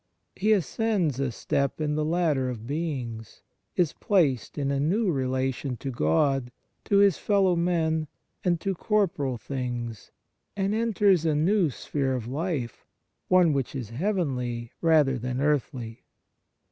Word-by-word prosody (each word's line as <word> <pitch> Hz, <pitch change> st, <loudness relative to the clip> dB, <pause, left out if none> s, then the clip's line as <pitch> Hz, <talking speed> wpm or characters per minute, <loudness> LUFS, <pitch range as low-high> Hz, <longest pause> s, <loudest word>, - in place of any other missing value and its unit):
He 215 Hz, +3 st, +1 dB
ascends 190 Hz, -, 0 dB
a 135 Hz, -3 st, 0 dB
step 140 Hz, +5 st, -1 dB
in 150 Hz, -1 st, 0 dB
the 155 Hz, 0 st, 0 dB
ladder 155 Hz, -5 st, +1 dB
of 115 Hz, -3 st, -6 dB
beings, 130 Hz, -7 st, -4 dB, 0.3 s
is 175 Hz, -5 st, +2 dB
placed 155 Hz, -, +1 dB
in 140 Hz, -1 st, 0 dB
a 140 Hz, -, 0 dB
new 185 Hz, +8 st, +1 dB
relation 130 Hz, -1 st, -1 dB
to 135 Hz, -, -5 dB
God, 120 Hz, -, +1 dB, 0.3 s
to 200 Hz, -, +3 dB
his 200 Hz, -3 st, +5 dB
fellow 195 Hz, -3 st, +3 dB
men, 160 Hz, -2 st, +1 dB, 0.4 s
and 175 Hz, -2 st, +1 dB
to 195 Hz, -, -1 dB
corporal 170 Hz, -, 0 dB
things, 120 Hz, -3 st, -5 dB, 0.5 s
and 195 Hz, +1 st, 0 dB
enters 205 Hz, -6 st, +3 dB
a 160 Hz, -2 st, +1 dB
new 175 Hz, +3 st, +3 dB
sphere 135 Hz, 0 st, -2 dB
of 120 Hz, -3 st, -4 dB
life, 140 Hz, -2 st, -3 dB, 0.4 s
one 180 Hz, -4 st, +5 dB
which 135 Hz, -1 st, -2 dB
is 120 Hz, -5 st, -5 dB
heavenly 125 Hz, -, -2 dB
rather 150 Hz, -6 st, +4 dB
than 125 Hz, +2 st, -3 dB
earthly. 130 Hz, -5 st, -1 dB
145 Hz, 140 wpm, -26 LUFS, 125-180 Hz, 0.5 s, his